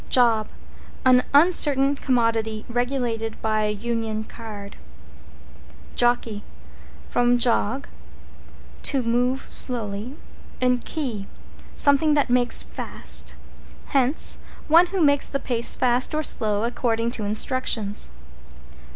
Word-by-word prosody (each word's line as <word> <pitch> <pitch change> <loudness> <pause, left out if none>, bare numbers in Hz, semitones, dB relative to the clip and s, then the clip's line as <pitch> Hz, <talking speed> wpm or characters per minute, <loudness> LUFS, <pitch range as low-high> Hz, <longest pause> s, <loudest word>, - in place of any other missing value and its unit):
=JOB= 230 -4 +3 0.6
An 250 -1 +5
uncertain 285 -3 +4
commodity 230 -5 0
regulated 240 -2 -2
by 215 -1 +1
a - - 0
Union 220 0 -3
Card. 210 -3 -10 1.2
=JOCKEY= 240 -3 +1 0.6
From 245 0 +2
jog, 240 +2 +1 0.9
to 270 -3 0
move 245 +3 0
slowly, 230 +1 -2 0.4
and 250 -1 +1
key, 240 -11 -4 0.5
something 295 +2 +4
that 285 -4 +1
makes 245 0 +4
fast. - - -2 0.5
Hence, 270 +1 +2 0.3
one 335 +3 +6
who 380 0 -2
makes 285 -2 +2
the 275 - -2
pace 235 -3 +1
fast 255 +4 +1
or 310 - 0
slow, 210 -6 0
according 235 -1 -1
to 230 -3 -5
instructions. 215 - -1
245 Hz, 105 wpm, -23 LUFS, 220-270 Hz, 1.2 s, one